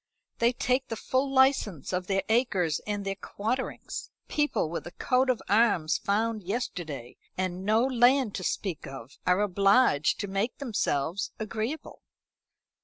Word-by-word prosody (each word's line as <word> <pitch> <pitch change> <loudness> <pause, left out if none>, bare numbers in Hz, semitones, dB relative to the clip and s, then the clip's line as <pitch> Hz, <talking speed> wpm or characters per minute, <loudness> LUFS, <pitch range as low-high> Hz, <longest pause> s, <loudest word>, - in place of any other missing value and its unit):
They 235 +1 +4
take 255 +2 0
the 225 - -3
full 260 +5 0
license 265 - +2
of 180 0 -1
their 195 -1 +1
acres 200 -9 +1
and 205 -1 -2
their 195 - -1
quarterings. 220 +6 -4 0.2
People 295 - 0
with 170 +2 -5
a - - -8
coat 255 +7 +1
of 250 - +1
arms 200 -7 +3
found 215 +2 0
yesterday, 170 - -4 0.2
and 185 0 -2
no 215 +3 +3
land 255 -2 +3
to 185 - -4
speak 175 -5 -2
of, 135 -2 -10
are 180 +2 +4
obliged 200 - +3
to 200 - -3
make 195 +5 -1
themselves 195 - -1
agreeable." 225 +7 -4
205 Hz, 145 wpm, -28 LUFS, 180-245 Hz, 0.2 s, They